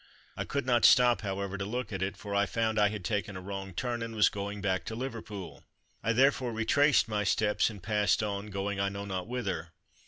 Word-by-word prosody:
I -, -, -3 dB
could 140 Hz, -2 st, -2 dB
not 120 Hz, -2 st, +2 dB
stop, 125 Hz, -2 st, +6 dB
however, 100 Hz, -1 st, -3 dB
to -, -, -1 dB
look 115 Hz, +1 st, -4 dB
at 95 Hz, -, -3 dB
it, 95 Hz, +1 st, -2 dB
for 100 Hz, -1 st, -6 dB
I 100 Hz, 0 st, +2 dB
found 110 Hz, +3 st, 0 dB
I 105 Hz, -, +5 dB
had 105 Hz, -4 st, -6 dB
taken 100 Hz, +1 st, -2 dB
a -, -, -5 dB
wrong 95 Hz, 0 st, -6 dB
turn 120 Hz, +5 st, -3 dB
and 115 Hz, 0 st, -5 dB
was 105 Hz, -, +5 dB
going 100 Hz, 0 st, -5 dB
back 95 Hz, -2 st, 0 dB
to 110 Hz, -, -5 dB
Liverpool. 110 Hz, -, -6 dB, 0.4 s
I 115 Hz, -, +1 dB
therefore 130 Hz, 0 st, +3 dB
retraced 130 Hz, +4 st, +3 dB
my 105 Hz, -2 st, -1 dB
steps 105 Hz, +2 st, +2 dB
and 100 Hz, -5 st, -10 dB
passed 105 Hz, 0 st, +2 dB
on, 100 Hz, 0 st, -3 dB
going 100 Hz, 0 st, -3 dB
I 100 Hz, 0 st, +1 dB
know 100 Hz, 0 st, -6 dB
not 95 Hz, -1 st, -4 dB
whither. 95 Hz, -9 st, -3 dB
105 Hz, 220 wpm, -30 LUFS, 100-115 Hz, 0.4 s, stop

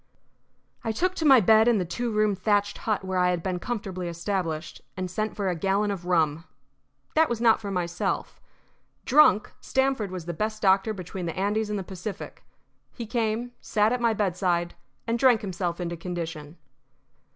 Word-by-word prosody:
I 225 Hz, -, -1 dB
took 365 Hz, +11 st, 0 dB
to 330 Hz, -, -3 dB
my 270 Hz, -4 st, +8 dB
bed 220 Hz, +3 st, +5 dB
in 240 Hz, -2 st, +4 dB
the 185 Hz, -, -1 dB
two 235 Hz, +8 st, -3 dB
roomed 210 Hz, -2 st, +1 dB
thatched 205 Hz, +1 st, +1 dB
hut 205 Hz, -3 st, 0 dB
where 190 Hz, -1 st, -1 dB
I 180 Hz, 0 st, +3 dB
had 175 Hz, -2 st, -1 dB
been 185 Hz, -2 st, -2 dB
comfortably 195 Hz, -5 st, -4 dB
established, 170 Hz, -2 st, -3 dB, 0.2 s
and 185 Hz, -1 st, -3 dB
sent 215 Hz, +4 st, -2 dB
for 200 Hz, -2 st, -2 dB
a 180 Hz, -, 0 dB
gallon 195 Hz, +4 st, +1 dB
of 180 Hz, -3 st, -6 dB
rum. 165 Hz, -3 st, +1 dB, 0.7 s
That 320 Hz, 0 st, +4 dB
was 235 Hz, -2 st, -2 dB
not 230 Hz, -1 st, +4 dB
for 205 Hz, -, -5 dB
myself. 175 Hz, -2 st, -2 dB, 0.6 s
Drunk, 270 Hz, -8 st, +5 dB
Stamford 265 Hz, -6 st, 0 dB
was 180 Hz, -3 st, -6 dB
the 175 Hz, -, -4 dB
best 215 Hz, +5 st, -2 dB
doctor 195 Hz, +1 st, +3 dB
between 185 Hz, -2 st, -6 dB
the 165 Hz, -, -5 dB
Andes 210 Hz, +3 st, 0 dB
and 210 Hz, -, -1 dB
the 195 Hz, -, -3 dB
Pacific. 190 Hz, +2 st, -7 dB, 0.5 s
He 235 Hz, -, -7 dB
came, 230 Hz, +1 st, -1 dB
sat 215 Hz, +2 st, +2 dB
at 250 Hz, -, -2 dB
my 230 Hz, -2 st, +2 dB
bedside, 180 Hz, -3 st, 0 dB, 0.3 s
and 230 Hz, +1 st, -1 dB
drank 250 Hz, -4 st, +5 dB
himself 180 Hz, -3 st, -3 dB
into 170 Hz, -1 st, -3 dB
condition. 165 Hz, -2 st, -6 dB
195 Hz, 180 wpm, -26 LUFS, 180-220 Hz, 0.7 s, my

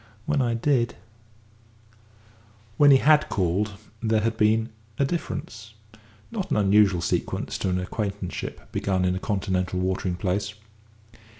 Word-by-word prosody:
When 145 Hz, -2 st, +1 dB
I 120 Hz, -2 st, +1 dB
did 120 Hz, -1 st, +1 dB, 0.9 s
" 110 Hz, 0 st, -29 dB
When 145 Hz, -1 st, +7 dB
he 135 Hz, -, +8 dB
had 150 Hz, +2 st, +4 dB
called, 100 Hz, +2 st, 0 dB, 0.3 s
there 110 Hz, -1 st, +2 dB
had 115 Hz, +1 st, 0 dB
been 110 Hz, +1 st, +2 dB, 0.3 s
a 140 Hz, -, +2 dB
difference 110 Hz, -8 st, -5 dB, 0.6 s
not 210 Hz, -5 st, -3 dB
an -, -, +1 dB
unusual 100 Hz, -3 st, +4 dB
sequel -, -, -1 dB
to 95 Hz, -, -3 dB
an 90 Hz, 0 st, 0 dB
acquaintanceship 100 Hz, 0 st, -5 dB
begun 95 Hz, -2 st, 0 dB
in 90 Hz, -, +2 dB
a 95 Hz, -, -2 dB
Continental 95 Hz, -3 st, -1 dB
watering 95 Hz, -1 st, -1 dB
place. 100 Hz, +3 st, -2 dB
105 Hz, 135 wpm, -25 LUFS, 95-115 Hz, 0.9 s, he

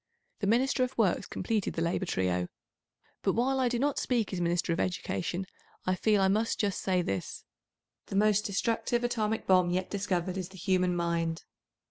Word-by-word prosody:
The 200 Hz, -, -1 dB
Minister 255 Hz, +4 st, +3 dB
of 255 Hz, +1 st, -3 dB
Works 195 Hz, -3 st, +2 dB
completed 210 Hz, +1 st, -2 dB
the 165 Hz, -, -1 dB
Labour 175 Hz, +2 st, -1 dB
trio. 90 Hz, -, 0 dB, 0.7 s
But -, -, +1 dB
while 265 Hz, +3 st, +1 dB
I 255 Hz, -2 st, +2 dB
do 240 Hz, -, 0 dB
not 285 Hz, +3 st, +1 dB
speak 235 Hz, -6 st, 0 dB
as 180 Hz, -, -2 dB
Minister 175 Hz, 0 st, +1 dB
of 165 Hz, -, -3 dB
Education, 180 Hz, 0 st, -2 dB, 0.4 s
I 185 Hz, -, +2 dB
feel 205 Hz, +2 st, +2 dB
I 190 Hz, -, +4 dB
must 215 Hz, +4 st, +1 dB
just 200 Hz, -2 st, 0 dB
say 185 Hz, -2 st, +1 dB
this: 95 Hz, -, -4 dB, 0.6 s
The -, -, -5 dB
most 210 Hz, 0 st, +4 dB
destructive 230 Hz, +4 st, 0 dB
atomic 220 Hz, -2 st, -1 dB
bomb 185 Hz, -2 st, +4 dB
yet 180 Hz, +1 st, -1 dB
discovered 190 Hz, -2 st, -1 dB
is 185 Hz, -1 st, -4 dB
the 190 Hz, -, -13 dB
human 185 Hz, -1 st, +1 dB
mind. 170 Hz, -1 st, -1 dB
190 Hz, 180 wpm, -30 LUFS, 175-225 Hz, 0.7 s, I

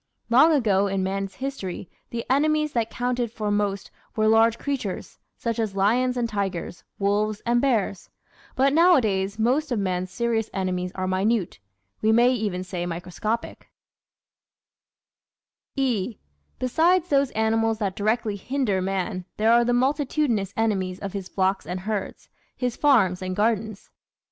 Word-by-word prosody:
Long 275 Hz, +7 st, +7 dB
ago 205 Hz, -9 st, +3 dB
in 195 Hz, -1 st, -1 dB
man's 195 Hz, 0 st, -3 dB
history 230 Hz, -9 st, -5 dB, 0.2 s
the 230 Hz, -1 st, -4 dB
enemies 305 Hz, +2 st, +2 dB
that 230 Hz, -2 st, 0 dB
counted 245 Hz, -1 st, -2 dB
for 215 Hz, -3 st, -3 dB
most 205 Hz, -1 st, -1 dB, 0.2 s
were 215 Hz, 0 st, +2 dB
large 225 Hz, +1 st, +4 dB
creatures, 260 Hz, -10 st, -4 dB, 0.2 s
such 230 Hz, -1 st, -3 dB
as 215 Hz, -3 st, -2 dB
lions 245 Hz, +6 st, +2 dB
and 240 Hz, -1 st, 0 dB
tigers, 195 Hz, -5 st, -4 dB
wolves 205 Hz, +1 st, 0 dB
and 240 Hz, 0 st, +2 dB
bears; 225 Hz, -8 st, 0 dB, 0.5 s
but 270 Hz, +1 st, +3 dB
nowadays 220 Hz, -, +3 dB
most 260 Hz, +7 st, +1 dB
of 240 Hz, -, +1 dB
man's 185 Hz, -2 st, -1 dB
serious 225 Hz, +1 st, -1 dB
enemies 180 Hz, -1 st, -2 dB
are 185 Hz, -, -2 dB
minute, 190 Hz, -, 0 dB, 0.4 s
we 220 Hz, -, +3 dB
may 240 Hz, +3 st, +5 dB
even 205 Hz, -6 st, -2 dB
say 180 Hz, -1 st, -4 dB
microscopic, 180 Hz, +6 st, -4 dB, 2.1 s
(e) 240 Hz, -5 st, -1 dB, 0.4 s
Besides 335 Hz, +7 st, +2 dB
those 275 Hz, -2 st, +3 dB
animals 225 Hz, 0 st, +1 dB
that 200 Hz, -3 st, -2 dB
directly 215 Hz, 0 st, 0 dB
hinder 230 Hz, -3 st, -1 dB
man 185 Hz, 0 st, -2 dB
there 220 Hz, +2 st, +3 dB
are 240 Hz, 0 st, +5 dB
the 240 Hz, -, +1 dB
multi 270 Hz, +4 st, +2 dB
tudinous 230 Hz, -11 st, 0 dB
enemies 190 Hz, -5 st, 0 dB
of 195 Hz, -1 st, -6 dB
his 195 Hz, -2 st, -5 dB
flocks 190 Hz, 0 st, 0 dB
and 180 Hz, +1 st, -4 dB
herds, 210 Hz, 0 st, -4 dB, 0.3 s
his 250 Hz, -2 st, -1 dB
farms 210 Hz, -11 st, +3 dB
and 185 Hz, 0 st, -3 dB
gardens. 215 Hz, -1 st, -1 dB
220 Hz, 145 wpm, -24 LUFS, 195-245 Hz, 2.1 s, Long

